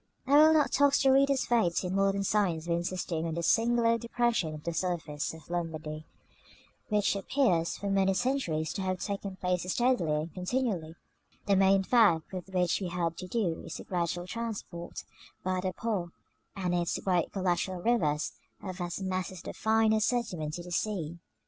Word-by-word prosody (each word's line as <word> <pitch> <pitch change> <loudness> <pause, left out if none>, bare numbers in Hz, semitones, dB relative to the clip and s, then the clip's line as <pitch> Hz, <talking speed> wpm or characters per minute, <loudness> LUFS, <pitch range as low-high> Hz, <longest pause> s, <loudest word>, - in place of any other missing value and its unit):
I 275 +2 +3
will 310 +2 +8
not 305 -2 +3
tax 285 0 +4
the 270 - +5
reader's 275 0 +3
faith 220 -9 +2
in 180 0 -2
modern 195 0 +2
science 185 -6 +1
by 170 - 0
insisting 170 -1 -2
on 160 - -3
the 170 - -2
singular 230 +3 +3
depression 235 -9 0
of 150 - -10
the 170 - -3
surface 165 -4 -2
of 160 0 -13
Lombardy, 155 -3 -4 0.8
which 210 -1 +2
appears 195 -6 +1
for 200 - -5
many 195 -1 +2
centuries 180 - 0
to 195 - -3
have 185 -1 -1
taken 200 -1 -4
place 180 -1 -1
steadily 180 -12 +2
and 165 - -9
continually; 180 -4 -2 0.5
the 200 - +3
main 195 0 +4
fact 195 -8 +3
with 185 0 -6
which 180 0 +1
we 185 - -2
have 170 -1 -2
to 185 - -6
do 180 -6 -1
is - - -7
the - - -8
gradual 175 -1 -2
transport, 200 -5 -5 0.4
by 185 0 0
the 185 0 -1
Po 195 -3 -2 0.5
and 180 -3 -1
its 175 -1 0
great 180 -3 0
collateral 185 -1 -1
rivers, 155 -9 +1 0.3
of 185 -2 -6
vast 175 +1 -4
masses 185 -1 -3
of - - -19
the - - -6
finer 220 0 +3
sediment 190 -10 -1
to 175 - -6
the 180 - -10
sea. 175 -4 -2
185 Hz, 180 wpm, -30 LUFS, 170-220 Hz, 0.8 s, will